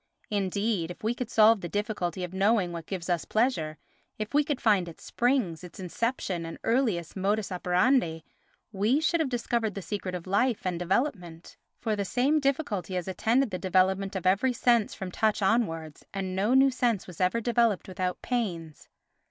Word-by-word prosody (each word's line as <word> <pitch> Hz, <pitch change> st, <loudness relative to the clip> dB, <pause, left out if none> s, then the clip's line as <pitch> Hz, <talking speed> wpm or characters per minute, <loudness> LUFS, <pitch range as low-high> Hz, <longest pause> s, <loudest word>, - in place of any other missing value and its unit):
Indeed, 200 Hz, -2 st, 0 dB
if 180 Hz, -, -9 dB
we 225 Hz, +2 st, +1 dB
could 245 Hz, -1 st, -5 dB
solve 220 Hz, -2 st, +5 dB
the 175 Hz, -, -5 dB
difficulty 205 Hz, -4 st, -2 dB
of 180 Hz, 0 st, -5 dB
knowing 195 Hz, -1 st, +2 dB
what 170 Hz, -2 st, -7 dB
gives 185 Hz, -3 st, -5 dB
us 175 Hz, -2 st, 0 dB
pleasure, 190 Hz, -10 st, 0 dB, 0.4 s
if 215 Hz, 0 st, -5 dB
we 295 Hz, +1 st, +4 dB
could 290 Hz, -2 st, -2 dB
find 200 Hz, -6 st, +3 dB
its 165 Hz, -, -13 dB
springs, 235 Hz, -, 0 dB
its 180 Hz, 0 st, -11 dB
inception 190 Hz, -1 st, -2 dB
and 165 Hz, 0 st, -7 dB
earliest 225 Hz, -, 0 dB
modus 205 Hz, +2 st, 0 dB
operandi, 180 Hz, -, +1 dB, 0.5 s
we 215 Hz, +7 st, +2 dB
should 335 Hz, +2 st, +1 dB
have 310 Hz, -4 st, +1 dB
discovered 235 Hz, -3 st, -1 dB
the 200 Hz, -, -4 dB
secret 190 Hz, -3 st, -4 dB
of 175 Hz, -, -6 dB
life 205 Hz, +4 st, +1 dB
and 180 Hz, -2 st, -1 dB
development, 180 Hz, -, -2 dB, 0.2 s
for 220 Hz, -2 st, -1 dB
the 200 Hz, -, -1 dB
same 260 Hz, +9 st, +2 dB
difficulty 275 Hz, -, -1 dB
has 180 Hz, -1 st, -2 dB
attended 230 Hz, +6 st, +1 dB
the 185 Hz, -, -3 dB
development 190 Hz, +1 st, +1 dB
of 185 Hz, -, -4 dB
every 200 Hz, +8 st, +3 dB
sense 235 Hz, -2 st, +2 dB
from 190 Hz, -1 st, -6 dB
touch 215 Hz, +3 st, +1 dB
onwards, 175 Hz, -8 st, 0 dB
and 190 Hz, -1 st, -3 dB
no 210 Hz, +7 st, +2 dB
new 270 Hz, 0 st, +6 dB
sense 240 Hz, -6 st, 0 dB
was 180 Hz, -1 st, -9 dB
ever 185 Hz, +6 st, +2 dB
developed 235 Hz, -3 st, +1 dB
without 185 Hz, -1 st, -3 dB
pains. 175 Hz, -11 st, -3 dB
200 Hz, 180 wpm, -28 LUFS, 180-235 Hz, 0.5 s, new